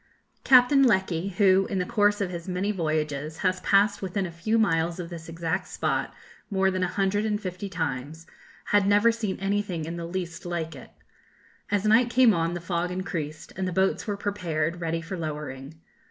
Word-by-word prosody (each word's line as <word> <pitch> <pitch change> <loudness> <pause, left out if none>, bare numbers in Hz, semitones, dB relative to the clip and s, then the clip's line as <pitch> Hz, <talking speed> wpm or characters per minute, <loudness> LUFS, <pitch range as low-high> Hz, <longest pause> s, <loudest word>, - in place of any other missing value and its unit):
Captain 260 +2 +6
Lecky, 190 -7 +2
who, 195 -1 +4
in 195 - -2
the 180 - 0
course 205 +1 +2
of 190 -2 -1
his 170 0 -6
many 185 +3 -1
voyages, 155 -4 -2
has 185 0 +2
passed 200 +2 +3
within 190 0 -2
a 175 - -5
few 190 +7 0
miles 170 -4 +1
of 175 0 -6
this 165 -1 -8
exact 165 +2 -2
spot - - -1 0.4
more 190 -2 +2
than 185 0 -2
a 180 - +2
hundred 200 +2 0
and 210 -1 0
fifty 190 0 -5
times, 160 -2 -4 0.5
had 205 -1 +4
never 205 +3 +5
seen 220 -4 -3
anything 195 -4 -1
in 170 +2 -5
the 170 -1 -5
least 175 -1 -5
like 165 -3 -4
it. 130 - -11 0.8
As 205 0 0
night 225 +3 +5
came 245 -2 +5
on 165 0 0
the - - -3
fog 175 0 -2
increased, 165 -4 -5
and 190 0 -2
the - - -2
boats 190 +5 +1
were 205 -1 -2
prepared 175 -5 -2
ready 165 0 -1
for 165 +3 -6
lowering. 150 -2 -6
185 Hz, 190 wpm, -26 LUFS, 165-205 Hz, 0.8 s, Captain